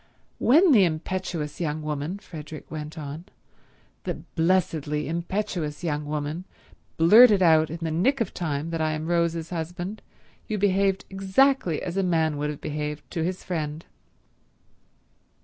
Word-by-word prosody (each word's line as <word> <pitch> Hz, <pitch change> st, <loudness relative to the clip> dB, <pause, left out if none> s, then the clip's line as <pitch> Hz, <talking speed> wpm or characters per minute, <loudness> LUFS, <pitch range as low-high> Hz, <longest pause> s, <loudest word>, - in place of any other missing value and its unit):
"When 320 Hz, +8 st, +5 dB
the 215 Hz, -7 st, +7 dB
impetuous 170 Hz, -2 st, -2 dB
young 155 Hz, -1 st, -2 dB
woman," 150 Hz, +4 st, -3 dB
Frederick 155 Hz, -6 st, -10 dB
went 155 Hz, +1 st, -6 dB
on, 150 Hz, +3 st, -6 dB, 0.8 s
"the -, -, -2 dB, 0.2 s
blessedly 160 Hz, -4 st, +1 dB
impetuous 170 Hz, -2 st, -3 dB
young 150 Hz, -3 st, -1 dB
woman, 150 Hz, +4 st, -3 dB, 0.5 s
blurted 205 Hz, +4 st, +7 dB
out 160 Hz, -2 st, +5 dB
in 165 Hz, -, -5 dB
the 160 Hz, -, -1 dB
nick 230 Hz, -, +2 dB
of 225 Hz, -5 st, -1 dB
time 155 Hz, -1 st, -3 dB
that 165 Hz, -1 st, -2 dB
I 155 Hz, 0 st, +1 dB
am 155 Hz, +1 st, -4 dB
Rose's 170 Hz, -1 st, 0 dB
husband, 175 Hz, +4 st, -4 dB, 0.5 s
you 215 Hz, -, -2 dB
behaved 195 Hz, -1 st, +2 dB
exactly 195 Hz, -, +2 dB
as 180 Hz, +1 st, -4 dB
a -, -, +3 dB
man 160 Hz, -4 st, +1 dB
would 150 Hz, +1 st, -1 dB
have 150 Hz, -, -6 dB
behaved 150 Hz, 0 st, -4 dB
to 165 Hz, -3 st, -2 dB
his 180 Hz, +2 st, -3 dB
friend." 155 Hz, -2 st, -4 dB
165 Hz, 145 wpm, -25 LUFS, 150-185 Hz, 0.8 s, the